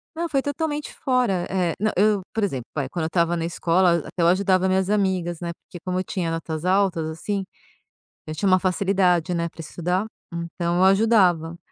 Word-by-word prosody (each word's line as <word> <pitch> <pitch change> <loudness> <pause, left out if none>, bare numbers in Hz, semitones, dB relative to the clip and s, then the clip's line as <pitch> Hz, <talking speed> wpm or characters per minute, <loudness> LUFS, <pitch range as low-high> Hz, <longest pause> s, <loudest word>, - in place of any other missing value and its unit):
Não, 335 0 -2
foi 275 -2 +1
totalmente 295 +1 -3
fora. 240 -9 0
Eh, 180 -3 0
não 215 +1 +1
eu 205 0 +3
por 220 -1 -1
exemplo, 130 -11 -3
vai, 140 -3 -1
quando 160 +2 -3
eu - - 0
estava 170 0 +1
na 165 -1 -2
escola, 175 +2 +2
a 165 - -3
até 175 - -4
eu 170 - +4
ajudava 185 0 +3
minhas 190 +1 +1
amigas, 185 -5 0
né, 170 -1 -3
porque 175 - -13
como 185 0 -1
eu - - -1
tinha 175 -3 -3
notas 165 0 -4
altas, 185 -4 +2
assim, 195 +5 -3 0.8
eu 155 - -5
tinha 195 +6 -1
uma 185 -1 +5
facilidade, 185 -2 +1
né, 170 0 -1
pra 165 - -24
estudar, 180 +5 -2 0.3
então 170 +1 -2
eu 185 - +4
ajudava. 190 -5 +3
185 Hz, 200 wpm, -23 LUFS, 170-200 Hz, 0.8 s, uma